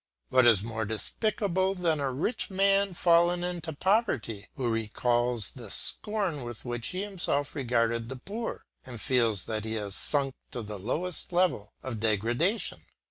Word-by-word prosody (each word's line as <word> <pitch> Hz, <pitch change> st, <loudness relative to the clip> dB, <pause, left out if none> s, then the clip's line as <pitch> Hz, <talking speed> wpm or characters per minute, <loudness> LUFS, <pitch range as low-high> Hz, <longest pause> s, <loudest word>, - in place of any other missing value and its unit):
What 130 Hz, -2 st, +6 dB
is 105 Hz, -5 st, +5 dB
more 110 Hz, 0 st, -3 dB
despicable 190 Hz, -, 0 dB
than 165 Hz, -4 st, +1 dB
a 140 Hz, -2 st, 0 dB
rich 160 Hz, -, 0 dB
man 195 Hz, 0 st, +3 dB
fallen 175 Hz, +1 st, +4 dB
into 175 Hz, -2 st, -3 dB
poverty, 145 Hz, -, 0 dB
who 130 Hz, -3 st, -1 dB
recalls 120 Hz, 0 st, +1 dB
the 120 Hz, -5 st, -9 dB
scorn 195 Hz, -, -1 dB
with 120 Hz, 0 st, -7 dB
which 120 Hz, -1 st, -2 dB
he 185 Hz, +2 st, -2 dB
himself 175 Hz, -8 st, -1 dB
regarded 115 Hz, -4 st, +1 dB
the 135 Hz, -, -4 dB
poor, 210 Hz, -, -5 dB, 0.2 s
and 120 Hz, -3 st, -8 dB
feels 115 Hz, -6 st, +2 dB
that 110 Hz, -1 st, -3 dB
he 110 Hz, 0 st, -3 dB
has 105 Hz, -2 st, -3 dB
sunk 135 Hz, +5 st, 0 dB, 0.2 s
to 120 Hz, -, -4 dB
the 105 Hz, -1 st, -6 dB
lowest 160 Hz, -, -3 dB
depth 175 Hz, -, +2 dB
of 120 Hz, -4 st, -4 dB
degradation? 120 Hz, -, +1 dB
130 Hz, 155 wpm, -29 LUFS, 115-180 Hz, 0.2 s, What